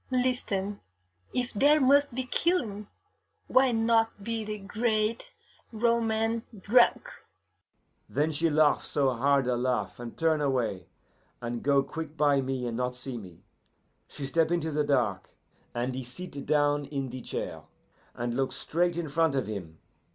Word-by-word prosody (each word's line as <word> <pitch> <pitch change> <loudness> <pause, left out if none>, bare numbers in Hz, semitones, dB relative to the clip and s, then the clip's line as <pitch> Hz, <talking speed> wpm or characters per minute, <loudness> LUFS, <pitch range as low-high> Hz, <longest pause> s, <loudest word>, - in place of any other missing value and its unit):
Listen: 245 -6 -1 0.5
if 245 -1 -2
there 290 +8 +5
must 280 -1 +4
be 260 - -1
killing, 240 - 0 0.6
why 260 0 +4
not 225 -2 +2
be 230 +1 -2
the 215 0 -4
great 215 - -1 0.4
Roman 225 0 +1 0.2
drunk!' 240 - +3 1.0
"Then 150 +2 +1
she 160 +2 +1
laugh 155 -1 +3
so 135 -2 +1
hard 135 +2 +2
a 125 0 +1
laugh, 120 -6 -1
and 120 -1 -8
turn 160 -2 +2
away, 120 - -1 0.5
and 120 0 -4
go 140 -1 +3
quick 160 +1 -7
by 145 -2 +3
me 130 -1 -2
and 120 -1 -3
not 125 +1 -2
see 125 -1 -6
me. 90 -5 -13 0.6
She 140 - -6
step 160 +3 +2
into 170 -2 0
the 150 0 +1
dark, 125 -10 0 0.5
and 120 +2 -1
he 130 +1 -4
sit 140 +3 -8
down 145 -1 +2
in 135 -3 -4
the 130 0 -6
chair, - - -5 0.5
and 120 0 -2
look 135 +2 -1
straight 175 +1 0
in 170 -2 -2
front 160 0 +1
of 130 - 0
him. 90 -7 -6
155 Hz, 150 wpm, -28 LUFS, -, 1.0 s, there